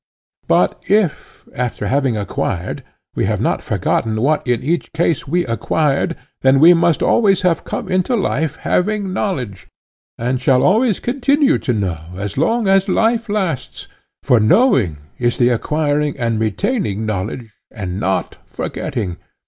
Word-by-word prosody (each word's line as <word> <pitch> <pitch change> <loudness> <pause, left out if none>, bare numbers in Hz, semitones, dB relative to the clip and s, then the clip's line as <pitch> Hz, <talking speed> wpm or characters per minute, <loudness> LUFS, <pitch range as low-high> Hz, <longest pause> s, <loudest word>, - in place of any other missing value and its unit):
But - - +1
if, 200 -7 0
after 125 -4 -3
having 130 -1 +1
acquired, 95 -3 -3 0.3
we - - -1
have - - -1
not - - 0
forgotten 110 -1 -1
what 150 +6 +2
in 120 -1 0
each 165 +5 -1
case 160 -2 0
we 175 +5 0
acquired, 140 +7 0 0.3
then 135 +1 +4
we 165 +4 +8
must 170 -2 +2
always 195 -5 +3
have 175 -3 +1
come - - -5
into 185 +6 +1
life 160 - -1
having 200 0 -1
knowledge, 125 - -3 0.5
and 125 +2 -1
shall 130 0 +3
always 220 +2 +3
continue 280 +3 +2
to 125 - -1
know 95 -7 -2 0.2
as 100 +1 -5
long 225 - +1
as 195 0 +3
life 225 +3 +1
lasts—for 165 - -2
knowing 110 - +3 0.2
is 120 -1 0
the 120 -1 +4
acquiring 145 +3 0
and 115 -3 -1
retaining 110 - -1
knowledge 110 +2 -4 0.2
and 95 -4 -5
not 95 -3 -1
forgetting. 95 -7 -4
140 Hz, 140 wpm, -18 LUFS, 115-190 Hz, 0.5 s, we